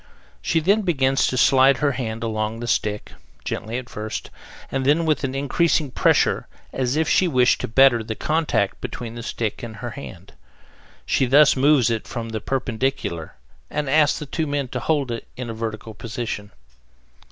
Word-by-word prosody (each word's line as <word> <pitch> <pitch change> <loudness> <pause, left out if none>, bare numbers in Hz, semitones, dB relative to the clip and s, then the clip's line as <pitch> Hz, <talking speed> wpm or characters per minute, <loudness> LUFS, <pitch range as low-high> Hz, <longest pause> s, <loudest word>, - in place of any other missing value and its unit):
She 165 - +1
then 200 +7 +3
begins 135 -8 +2
to 130 - -1
slide 135 +1 +5
her 145 +3 +1
hand 115 -4 -4
along 110 0 -2
the 120 - -5
stick, 105 -2 -1 0.3
gently 115 +3 -3
at 125 -1 -6
first, 110 -2 -6 0.4
and 135 0 -1
then 150 +5 +3
with 155 -2 +1
an 135 0 -2
increasing 145 +1 +1
pressure, - - +2 0.3
as 130 0 0
if 160 0 +1
she 185 - +3
wished 125 -6 +3
to - - -2
better 120 0 +5
the 110 0 -5
contact 155 -11 0
between 115 -2 -6
the 120 - -7
stick 115 -1 -3
and 115 -3 -7
her 105 - -6
hand. - - -10 0.7
She 130 - +1
thus 145 +3 +6
moves 135 -3 +4
it 115 -1 -2
from 115 -1 -5
the 110 -1 -4
perpendicular 125 - -2 0.3
and 150 -1 -2
asks 150 +2 +3
the 150 - -6
two 155 +2 -2
men 145 -2 -2
to 125 - -3
hold 140 -1 0
it 115 - -5
in 125 -2 -5
a - - -5
vertical 110 0 -5
position. 115 -2 -5
130 Hz, 180 wpm, -22 LUFS, 115-145 Hz, 0.7 s, thus